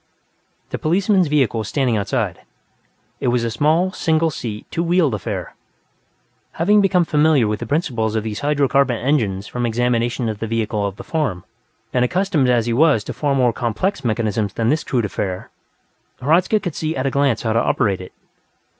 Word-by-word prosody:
The -, -, -3 dB
policeman's 185 Hz, +2 st, +2 dB
vehicle 140 Hz, -6 st, +1 dB
was 110 Hz, -, -4 dB
standing 130 Hz, -4 st, 0 dB
outside. 100 Hz, -2 st, -1 dB, 0.8 s
It -, -, -2 dB
was 120 Hz, -1 st, +1 dB
a 115 Hz, -, -1 dB
small, 155 Hz, +9 st, +2 dB
single 160 Hz, -2 st, +1 dB
seat, 110 Hz, -6 st, -6 dB
two 165 Hz, -, -1 dB
wheeled 170 Hz, -5 st, +2 dB
affair. 105 Hz, -, -4 dB, 1.0 s
Having 205 Hz, +5 st, +3 dB
become 185 Hz, -3 st, +3 dB
familiar 150 Hz, -6 st, +3 dB
with 105 Hz, 0 st, -2 dB
the 120 Hz, -, -5 dB
principles 120 Hz, -7 st, -1 dB
of 110 Hz, -, 0 dB
these 110 Hz, -1 st, -4 dB
hydro 145 Hz, -1 st, +1 dB
carbon 135 Hz, -3 st, +2 dB
engines 110 Hz, -7 st, 0 dB
from 125 Hz, +2 st, -4 dB
examination 120 Hz, 0 st, 0 dB
of 110 Hz, -2 st, -3 dB
the 115 Hz, -, -3 dB
vehicle 105 Hz, -2 st, -1 dB
of 100 Hz, -, -6 dB
the -, -, -9 dB
farm, 135 Hz, -, -2 dB, 0.5 s
and 125 Hz, -, +2 dB
accustomed 160 Hz, -2 st, +1 dB
as 120 Hz, -2 st, +2 dB
he 120 Hz, -, 0 dB
was 140 Hz, -4 st, +3 dB
to -, -, -6 dB
far 145 Hz, -2 st, 0 dB
more 125 Hz, -3 st, +2 dB
complex 130 Hz, -, -2 dB
mechanisms 110 Hz, -3 st, -1 dB
than 115 Hz, 0 st, 0 dB
this 150 Hz, +3 st, +1 dB
crude 120 Hz, -4 st, 0 dB
affair, 95 Hz, -2 st, -4 dB, 0.7 s
Hradzka 170 Hz, -, +2 dB
could 175 Hz, -5 st, -4 dB
see 155 Hz, +1 st, -3 dB
at 130 Hz, -, -2 dB
a 135 Hz, -, +1 dB
glance 140 Hz, -4 st, +1 dB
how 110 Hz, -2 st, 0 dB
to 115 Hz, -, +3 dB
operate 95 Hz, -3 st, 0 dB
it. 90 Hz, -, -10 dB
125 Hz, 185 wpm, -20 LUFS, 110-155 Hz, 1.0 s, Having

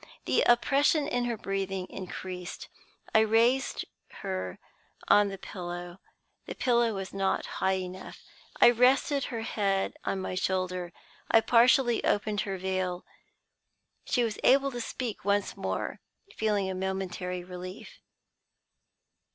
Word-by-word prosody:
The -, -, +3 dB
oppression 280 Hz, +5 st, +3 dB
in 245 Hz, -4 st, 0 dB
her 235 Hz, -2 st, -2 dB
breathing 195 Hz, -2 st, -3 dB
increased. 185 Hz, -1 st, -7 dB, 0.4 s
I 220 Hz, -, +7 dB
raised 230 Hz, +4 st, +2 dB, 0.4 s
her 95 Hz, -1 st, -3 dB, 0.5 s
on 205 Hz, 0 st, +6 dB
the 195 Hz, -1 st, -5 dB
pillow. 175 Hz, -1 st, -7 dB, 0.5 s
The -, -, -5 dB
pillow 235 Hz, -3 st, +2 dB
was 195 Hz, -1 st, -5 dB
not 195 Hz, -1 st, 0 dB, 0.2 s
high 190 Hz, 0 st, +3 dB
enough. 185 Hz, 0 st, -7 dB, 0.4 s
I 240 Hz, -, +8 dB
rested 260 Hz, +3 st, +3 dB
her 230 Hz, -3 st, -4 dB
head 195 Hz, -3 st, 0 dB
on 195 Hz, -, -1 dB
my 185 Hz, -, -4 dB
shoulder, 185 Hz, -1 st, -1 dB, 0.4 s
and 225 Hz, -, +5 dB
partially 240 Hz, 0 st, +4 dB
opened 210 Hz, 0 st, +1 dB
her 195 Hz, -2 st, -3 dB
veil. 185 Hz, -1 st, -2 dB, 1.0 s
She 245 Hz, -, +1 dB
was 225 Hz, -3 st, -2 dB
able 275 Hz, +1 st, +5 dB
to 245 Hz, -1 st, -4 dB
speak 230 Hz, 0 st, -4 dB
once 200 Hz, +1 st, +1 dB
more, -, -, -3 dB, 0.4 s
feeling 210 Hz, -3 st, +1 dB
a 190 Hz, -, -2 dB
momentary 185 Hz, -1 st, -3 dB
relief. 180 Hz, +1 st, -9 dB
195 Hz, 125 wpm, -29 LUFS, 185-235 Hz, 1.0 s, I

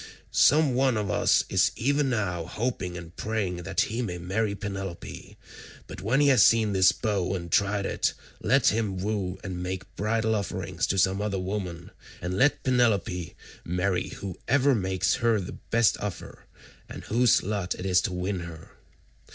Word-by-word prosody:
Some 150 Hz, -2 st, +4 dB
one 130 Hz, -2 st, +2 dB
of 105 Hz, -4 st, -2 dB
us -, -, +3 dB
is -, -, +2 dB
even 140 Hz, +3 st, +1 dB
now 90 Hz, -8 st, -1 dB
hoping 105 Hz, -7 st, -3 dB
and 85 Hz, -1 st, -10 dB
praying 105 Hz, -5 st, -2 dB
that 95 Hz, +2 st, -1 dB
he 115 Hz, +3 st, -1 dB
may 90 Hz, -7 st, -3 dB
marry 100 Hz, +4 st, -1 dB
Penelope, 95 Hz, -3 st, -7 dB, 0.5 s
but -, -, -9 dB
when 115 Hz, +8 st, +1 dB
he 145 Hz, -, +5 dB
has 130 Hz, -5 st, +5 dB
seen 110 Hz, -3 st, +4 dB
this 95 Hz, -1 st, +5 dB
bow 95 Hz, -3 st, -1 dB
and 85 Hz, -2 st, -6 dB
tried 100 Hz, -1 st, +2 dB
it, -, -, 0 dB, 0.3 s
let 125 Hz, +3 st, +4 dB
him 105 Hz, -3 st, -1 dB
woo 95 Hz, -1 st, -2 dB
and 90 Hz, -2 st, -5 dB
make 90 Hz, 0 st, -5 dB
bridal 110 Hz, +2 st, 0 dB
offerings 100 Hz, -4 st, -2 dB
to 95 Hz, -, -1 dB
some 95 Hz, +2 st, +2 dB
other 105 Hz, -2 st, -1 dB
woman, 90 Hz, -3 st, -4 dB, 0.3 s
and 90 Hz, +2 st, -3 dB
let 140 Hz, +9 st, +2 dB
Penelope 105 Hz, -, +1 dB, 0.3 s
marry 90 Hz, +1 st, -1 dB
whoever 130 Hz, +9 st, 0 dB
makes 95 Hz, -3 st, 0 dB
her 115 Hz, -2 st, +3 dB
the 90 Hz, -, -7 dB
best 115 Hz, -1 st, +3 dB
offer 105 Hz, -4 st, -7 dB, 0.4 s
and -, -, -8 dB
whose 120 Hz, +1 st, +3 dB
lot 100 Hz, -2 st, -2 dB
it 90 Hz, -, -7 dB
is 90 Hz, -2 st, +3 dB
to -, -, -2 dB
win 90 Hz, +1 st, -2 dB
her." 85 Hz, -2 st, -9 dB
100 Hz, 165 wpm, -27 LUFS, 90-110 Hz, 0.5 s, he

